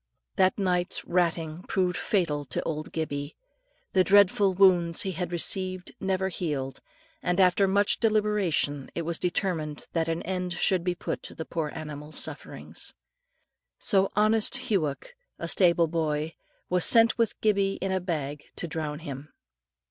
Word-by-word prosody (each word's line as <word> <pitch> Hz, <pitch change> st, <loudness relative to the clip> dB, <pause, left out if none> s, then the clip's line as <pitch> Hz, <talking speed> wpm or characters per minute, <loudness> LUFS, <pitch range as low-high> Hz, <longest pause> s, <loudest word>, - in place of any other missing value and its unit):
That 185 Hz, -1 st, +3 dB
night's 180 Hz, -2 st, 0 dB
ratting 170 Hz, -2 st, -1 dB
proved 180 Hz, -2 st, 0 dB
fatal 165 Hz, -8 st, 0 dB
to 130 Hz, -, -3 dB
old 155 Hz, -1 st, -4 dB
Gibbie. 145 Hz, -2 st, -4 dB, 0.6 s
The 185 Hz, -, +5 dB
dreadful 200 Hz, 0 st, +4 dB
wounds 180 Hz, -3 st, +4 dB
he 190 Hz, -, -2 dB
had 180 Hz, 0 st, -4 dB
received 185 Hz, +1 st, 0 dB
never 190 Hz, 0 st, -1 dB
healed, 145 Hz, -7 st, -3 dB, 0.4 s
and 180 Hz, +1 st, 0 dB
after 190 Hz, +1 st, +4 dB
much 200 Hz, +1 st, +2 dB
deliberation 210 Hz, -, +1 dB
it 170 Hz, -, -2 dB
was 165 Hz, 0 st, -3 dB
determined 170 Hz, -5 st, -2 dB
that 165 Hz, -1 st, 0 dB
an 165 Hz, 0 st, -2 dB
end 180 Hz, -1 st, -3 dB
should 180 Hz, 0 st, +1 dB
be 180 Hz, 0 st, -1 dB
put -, -, -4 dB
to -, -, -9 dB
the 160 Hz, -, -6 dB
poor 155 Hz, -3 st, -3 dB
animal's 150 Hz, -1 st, -7 dB
sufferings. -, -, -6 dB, 0.8 s
So 195 Hz, -2 st, +3 dB
honest 220 Hz, +4 st, +2 dB
Hughoc, 160 Hz, -, -1 dB, 0.2 s
the -, -, -5 dB
stable 170 Hz, -3 st, +4 dB
boy, 160 Hz, -1 st, -2 dB, 0.3 s
was 180 Hz, -1 st, +2 dB
sent 230 Hz, 0 st, +5 dB
with 230 Hz, -, 0 dB
Gibbie 200 Hz, -2 st, +2 dB
in 190 Hz, 0 st, -3 dB
a 190 Hz, -, +1 dB
bag 150 Hz, -5 st, -4 dB
to 175 Hz, -, -3 dB
drown 155 Hz, -2 st, -4 dB
him. 145 Hz, -1 st, -7 dB
180 Hz, 150 wpm, -27 LUFS, 155-195 Hz, 0.8 s, The